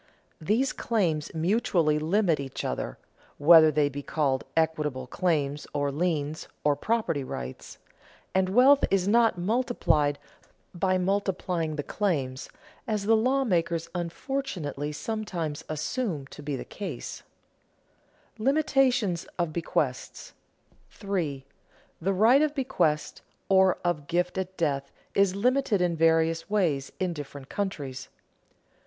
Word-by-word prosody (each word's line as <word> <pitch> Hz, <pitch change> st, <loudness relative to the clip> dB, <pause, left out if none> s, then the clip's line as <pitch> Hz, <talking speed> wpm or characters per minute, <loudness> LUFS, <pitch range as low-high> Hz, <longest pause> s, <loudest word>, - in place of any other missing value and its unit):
These 225 Hz, +11 st, +1 dB
claims 170 Hz, -10 st, 0 dB
mutually 165 Hz, -3 st, +2 dB
limit 170 Hz, 0 st, +2 dB
each 135 Hz, -2 st, -5 dB
other -, -, -3 dB, 0.4 s
(whether 160 Hz, +1 st, +8 dB
they 150 Hz, -1 st, +2 dB
be 145 Hz, 0 st, -5 dB
called 140 Hz, -3 st, 0 dB
equitable 150 Hz, -5 st, 0 dB
claims, 150 Hz, -1 st, -1 dB
or 145 Hz, -1 st, 0 dB
liens, 155 Hz, -1 st, -2 dB, 0.2 s
or 145 Hz, -1 st, +3 dB
property 215 Hz, -4 st, -1 dB
rights), 65 Hz, -, -7 dB, 0.6 s
and 190 Hz, 0 st, +2 dB
wealth 260 Hz, +7 st, +6 dB
is 195 Hz, -1 st, +1 dB
not 230 Hz, -1 st, +4 dB
multiplied 175 Hz, -, +1 dB, 0.6 s
by 185 Hz, +1 st, +1 dB
multiplying 180 Hz, -4 st, -1 dB
the 145 Hz, -, -3 dB
claims, 140 Hz, -12 st, -2 dB, 0.4 s
as 210 Hz, -2 st, -1 dB
the 225 Hz, +2 st, +5 dB
lawmakers 220 Hz, -9 st, +1 dB
unfortunately 175 Hz, -, -3 dB
sometimes 175 Hz, -4 st, -4 dB
assume 155 Hz, -, -2 dB
to -, -, -10 dB
be 145 Hz, -1 st, -3 dB
the -, -, -6 dB
case. 205 Hz, -, -6 dB, 1.2 s
[Sidenote: -, -, -6 dB
Limitation 265 Hz, -, +2 dB, 0.2 s
of 170 Hz, -3 st, -1 dB
bequest] 170 Hz, -, -2 dB, 0.6 s
3. 170 Hz, -10 st, -3 dB, 0.6 s
_The 190 Hz, +2 st, 0 dB
right 240 Hz, +6 st, +6 dB
of 305 Hz, -1 st, +1 dB
bequest, 205 Hz, -, 0 dB, 0.3 s
or 190 Hz, -1 st, +5 dB
of 155 Hz, -5 st, -1 dB
gift 180 Hz, +2 st, 0 dB
at 190 Hz, 0 st, -5 dB
death, 140 Hz, -4 st, -1 dB, 0.2 s
is 195 Hz, -1 st, +3 dB
limited 250 Hz, 0 st, +2 dB
in 175 Hz, -1 st, +1 dB
various 165 Hz, +1 st, +2 dB
ways 165 Hz, -10 st, 0 dB
in 185 Hz, -2 st, 0 dB
different 140 Hz, -3 st, -9 dB
countries. 140 Hz, -10 st, -4 dB
170 Hz, 120 wpm, -27 LUFS, 150-205 Hz, 1.2 s, whether